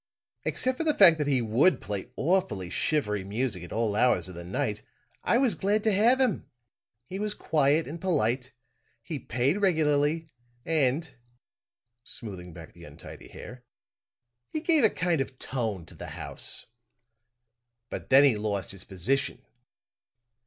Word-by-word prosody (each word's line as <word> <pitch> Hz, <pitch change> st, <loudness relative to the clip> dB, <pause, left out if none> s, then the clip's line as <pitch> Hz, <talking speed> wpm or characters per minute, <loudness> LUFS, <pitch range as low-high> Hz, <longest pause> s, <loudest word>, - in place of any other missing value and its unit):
Except 260 Hz, 0 st, -1 dB
for -, -, +1 dB
the 305 Hz, -2 st, +2 dB
fact 170 Hz, -5 st, +7 dB
that 150 Hz, -, 0 dB
he 130 Hz, -4 st, +2 dB
would 120 Hz, +12 st, +3 dB
play 100 Hz, 0 st, -5 dB
awfully 125 Hz, -, 0 dB
shivery 105 Hz, -10 st, 0 dB
music 105 Hz, 0 st, -2 dB
at 90 Hz, -, -10 dB
all 110 Hz, -2 st, 0 dB
hours 105 Hz, -7 st, +3 dB
of 95 Hz, -, -9 dB
the 85 Hz, 0 st, -8 dB
night, 105 Hz, +4 st, -2 dB, 0.4 s
I 235 Hz, -, +3 dB
was 255 Hz, -3 st, +3 dB
glad 205 Hz, +2 st, 0 dB
to 220 Hz, -, +3 dB
have 230 Hz, +6 st, +4 dB
him. 260 Hz, -2 st, +1 dB, 0.6 s
He 190 Hz, +8 st, -6 dB
was 210 Hz, 0 st, -2 dB
quiet 150 Hz, +1 st, +2 dB
and 160 Hz, +3 st, -7 dB
polite; 130 Hz, -7 st, 0 dB, 0.5 s
he 160 Hz, -4 st, -5 dB
paid 135 Hz, +11 st, 0 dB
regularly 155 Hz, -3 st, +2 dB, 0.3 s
and," 155 Hz, 0 st, 0 dB, 0.9 s
smoothing 95 Hz, -8 st, -4 dB
back 80 Hz, -1 st, -11 dB
the -, -, -15 dB
untidy -, -, -11 dB
hair, 125 Hz, 0 st, -11 dB, 0.9 s
"he 310 Hz, -, -3 dB
gave 315 Hz, -3 st, +2 dB
a 220 Hz, -, +7 dB
kind 170 Hz, -6 st, 0 dB
of 135 Hz, -1 st, -5 dB
tone 110 Hz, -11 st, -3 dB
to -, -, -14 dB
the -, -, -9 dB
house. -, -, -3 dB, 1.3 s
"But -, -, -6 dB
then 135 Hz, +2 st, +7 dB
he 135 Hz, -5 st, +5 dB
lost 105 Hz, -3 st, -2 dB
his 95 Hz, -1 st, -6 dB
position. 110 Hz, +9 st, -2 dB
135 Hz, 150 wpm, -28 LUFS, -, 1.3 s, fact